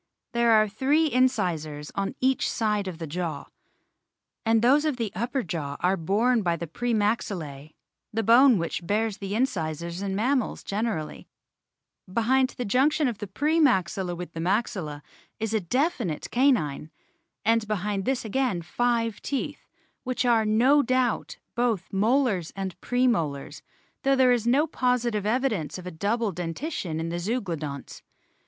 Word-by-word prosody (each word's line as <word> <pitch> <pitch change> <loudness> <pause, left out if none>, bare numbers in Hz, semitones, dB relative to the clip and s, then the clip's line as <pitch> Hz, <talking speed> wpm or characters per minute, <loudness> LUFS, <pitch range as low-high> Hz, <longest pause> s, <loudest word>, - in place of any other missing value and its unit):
There 235 -1 +3
are 215 0 +5
three 285 +9 +1
incisors 175 - 0
on 195 0 -2
each 260 0 +1
side 210 -3 0
of 175 -3 -6
each 160 - -6
jaw, 170 -1 -3 1.0
and 225 0 +3
those 280 +5 +5
of 305 -5 0
the 225 -4 -2
upper 240 +6 -2
jaw 150 -5 -4
are 185 +2 +2
borne 215 +8 +2
by 170 -3 +1
the 170 - -5
pre 240 +10 -3
maxillae, 180 -10 -2 0.4
the 225 +1 -1
bone 240 +2 +6
which 170 0 -3
bears 215 +1 0
the 200 0 -4
incisors 170 - -2
in 195 -1 -2
mammals 250 +3 0
generally; 205 -6 -3 0.8
behind 255 +5 +2
the 245 - -2
junction 275 +7 +2
of 235 -5 -3
the 205 - -5
pre 300 - +1
maxilla 190 - +2
with 175 -1 -7
the 165 - -6
maxilla 170 -5 -1 0.4
is 220 0 -2
a 220 - +3
definite 235 - -1
canine, 225 - +2 0.6
and 225 0 +2
behind 205 -1 -2
this 260 -3 -1
again 220 -6 0
five 230 +2 0
teeth, 275 - -4 0.4
which 255 0 -1
are 230 -2 +4
no 250 +7 +5
doubt 255 -2 0 0.2
both 230 -7 -1
molars 210 - +2
and 190 -2 -5
pre 245 +1 +1
molars, 155 - -1 0.4
though 275 0 +3
there 260 -1 +5
is 235 -2 +1
no 275 +6 +4
positive 245 -7 0
evidence 220 - 0
of 180 - -9
a 180 - -5
double 210 +6 -1
dentition 175 - -4
in 165 +1 -3
the 170 +1 -3
Zeuglodonts. 170 - -4
215 Hz, 155 wpm, -26 LUFS, 175-250 Hz, 1.0 s, bone